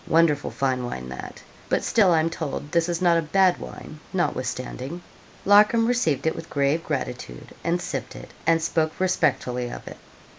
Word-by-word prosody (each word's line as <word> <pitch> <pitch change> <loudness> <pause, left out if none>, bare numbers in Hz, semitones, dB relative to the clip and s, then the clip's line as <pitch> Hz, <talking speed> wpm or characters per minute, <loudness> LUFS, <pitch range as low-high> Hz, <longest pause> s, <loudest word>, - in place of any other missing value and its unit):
Wonderful 160 -3 +3
fine 130 -2 -1
wine 65 - -5
that! 65 - -8 0.3
but - - +1
still 210 -5 +4
I'm 165 0 +2
told 150 -2 -5
this 170 0 +2
is 175 +1 -1
not 170 -1 +5
a - - 0
bad 185 +3 +3
wine 155 - -9
notwithstanding.' 140 -1 -3 0.4
Larcom 210 +3 +6
received 160 - +1
it 160 - +1
with - - -8
grave 145 +3 +1
gratitude, 125 - -5
and 170 +1 +1
sipped - - -5
it, - - -10 0.2
and 165 0 +5
spoke 160 -1 0
respectfully 125 -9 0
of - - -9
it. - - -8
160 Hz, 170 wpm, -24 LUFS, 135-175 Hz, 0.4 s, Larcom